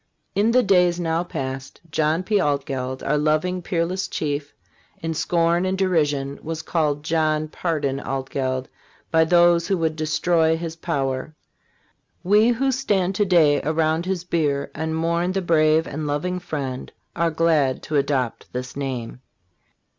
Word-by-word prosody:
In 210 +3 +2
the 250 +2 +4
days 180 -3 +3
now 165 0 0
past, 135 -6 -6
John 155 +3 +1
P. 205 +1 +1
Altgeld, 135 -3 -2
our 150 +2 +1
loving, 155 +5 +1
peerless 180 +1 -1
chief, 145 -1 -3 0.5
in 165 -3 -3
scorn 170 +2 +1
and 185 0 0
derision 145 -7 0
was 165 +1 -5
called 150 -4 0
John 155 -1 +1
Pardon 150 -5 -2
Altgeld 130 -1 -3 0.4
by 160 0 +5
those 175 0 +4
who 195 -1 +1
would 160 -2 0
destroy 160 +1 +2
his 165 -1 -5
power. 140 -3 -2 0.9
We 210 +4 +4
who 265 +3 +1
stand 200 -8 0
to 205 +2 +1
day 160 -6 +4
around 160 +2 0
his 185 -2 -1
bier 150 -5 -1
and 160 +1 -3
mourn 170 +2 0
the 195 - 0
brave 160 -1 +3
and 150 +1 -4
loving 180 +6 -1
friend 135 -7 -5 0.2
are 170 0 +1
glad 155 -5 +1
to 155 - -4
adopt 135 -4 -1
this 125 0 -5
name. 130 -3 -4
160 Hz, 145 wpm, -23 LUFS, 145-175 Hz, 0.9 s, by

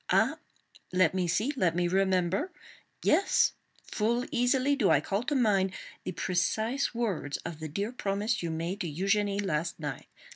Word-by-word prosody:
Ah! - - +3 0.5
let 180 -2 +3
me 185 -2 0
see! 215 - +1
Let 180 -9 +1
me 175 0 +1
remember! 190 - +1 0.5
Yes; 395 - +3 0.3
full 235 +3 0
easily 260 +3 +2
do 225 -9 +2
I - - +5
call 200 +2 -1
to 290 +4 -1
mind 200 -7 +2 0.3
the - - -2
precise 220 +10 0
words 195 -11 -1
of 160 - -5
the 155 - -4
dear 200 +9 -3
promise 210 -1 -1
you 170 - -2
made 170 +5 -3
to 170 -4 -2
Eugénie 200 +4 +1
last 165 -1 -1
night. 145 -3 -5
195 Hz, 160 wpm, -29 LUFS, 175-230 Hz, 0.5 s, I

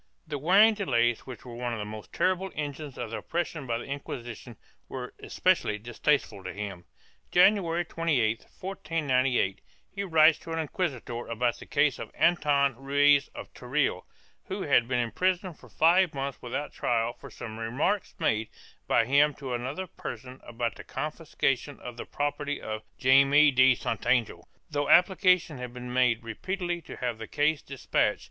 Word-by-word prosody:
1 - - -26
The 145 - -2
wearing 195 +9 +6
delays, 120 - 0
which 130 -1 -9
were 120 - -9
one 120 0 -3
of - - -3
the 105 - -4
most 105 0 -9
terrible 185 +1 0
engines 145 -1 -5
of 115 - -5
oppression 160 +1 -3
by 115 -1 0
the 120 - -6
Inquisition, 120 -4 -7 0.3
were 125 -2 -6
especially 175 - +1
distasteful 115 -2 -1
to 95 - -5
him. 100 -2 -6 0.5
January 175 -2 +4
28, 140 -10 0 0.2
1498, 135 - 0 0.3
he 200 - -3
writes 160 -3 +5
to 165 - -9
an - - -2
inquisitor 140 - -3
about 120 +1 -1
the - - -11
case 145 -2 +2
of - - -6
Anton 145 -6 +3
Ruiz 140 +1 +4
of - - -9
Teruel, 125 -7 -1 0.4
who - - -4
had 120 - +3
been 125 -1 0
imprisoned 180 - -1
for - - -16
five 170 0 +3
months 135 0 -4
without 130 +4 -4
trial 115 0 0
for 120 - -12
some 110 -1 -8
remarks 130 - -1
made 110 0 0 0.4
by 115 - +3
him 140 +3 +4
to 135 -3 -5
another 130 +10 -3
person 125 -6 -8
about 120 0 -3
the - - -9
confiscation 145 -3 -2
of 125 -1 -8
the - - -6
property 145 0 -2
of 110 0 -5 0.2
Jaime 140 +3 +6
de 130 -1 +5
Santangel, 120 -2 -1 0.2
though 145 -1 -2
application 180 -3 +4
had 125 -1 -6
been 125 0 -6
made 125 -2 +2
repeatedly 175 - -3
to - - -10
have 120 -3 -3
the 110 - -6
case 150 +4 +1
despatched. 140 -2 0
135 Hz, 165 wpm, -28 LUFS, 120-160 Hz, 0.5 s, wearing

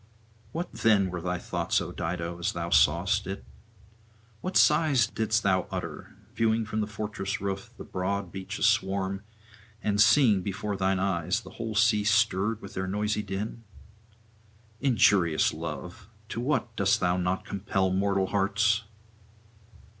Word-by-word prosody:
What 170 +2 -4
then 100 -4 +3
were 90 -1 -4
thy 90 +1 -2
thoughts, - - -1
O - - -5
Dido, 85 +1 -4
as 85 - -1
thou 85 0 -4
sawest 95 +6 +3
it? 95 +1 -6 1.0
What 185 +1 -1
sighs 150 -6 +4
didst 110 0 0
thou 95 -2 +2
utter, - - -6 0.2
viewing 115 -1 +1
from 110 0 -2
the 105 - -2
fortress 100 -2 -4
roof 100 0 -4
the - - -8
broad 95 0 -3
beach 95 +1 -6
aswarm, 95 0 +1 0.6
and 105 -1 +2
seeing 110 -7 +5
before 100 +2 -3
thine 95 0 +1
eyes 95 +1 0
the - - -12
whole 115 -2 -5
sea 105 -1 +4
stirred 110 0 +2
with - - -9
their 95 0 -3
noisy 105 +2 -1
din? 105 +3 -5 1.2
Injurious 100 - +3
Love, 80 +4 -7 0.2
to 115 - -3
what 120 -3 -1
dost 100 -1 +2
thou 90 -1 +2
not 90 +1 -1
compel 95 -1 -1
mortal 100 0 +1
hearts! 105 +2 +1
100 Hz, 145 wpm, -28 LUFS, 95-110 Hz, 1.2 s, seeing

